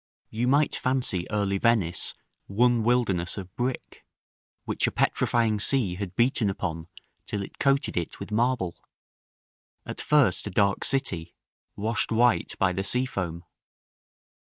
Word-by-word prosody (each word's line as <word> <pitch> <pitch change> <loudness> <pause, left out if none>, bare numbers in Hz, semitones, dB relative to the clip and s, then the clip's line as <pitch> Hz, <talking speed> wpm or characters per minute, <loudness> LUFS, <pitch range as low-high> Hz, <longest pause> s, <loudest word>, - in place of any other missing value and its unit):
You 115 +3 -1
might 145 +3 +3
fancy 125 -9 -1
early 100 -2 0
Venice 105 -7 +1 0.3
one 120 +3 +3
wilderness 110 -8 +1
of 95 -2 -8
brick, 125 +1 -4 0.6
which - - 0
a - - 0
petrifying 115 -3 +1
sea 115 -5 +1
had 95 0 -6
beaten 120 -3 +2
upon 85 -4 -4 0.4
till 100 -2 -3
it - - -11
coated 140 0 +1
it 85 -2 -3
with - - -7
marble: 115 -5 0 1.1
at - - -6
first 130 -12 +2
a - - -2
dark 100 +1 +1
city 95 - -1 0.4
washed 110 +3 -1
white 120 +1 +2
by 95 -1 +2
the 95 +2 -2
sea 125 +6 +1
foam. 85 -8 -4
105 Hz, 135 wpm, -26 LUFS, 95-125 Hz, 1.1 s, might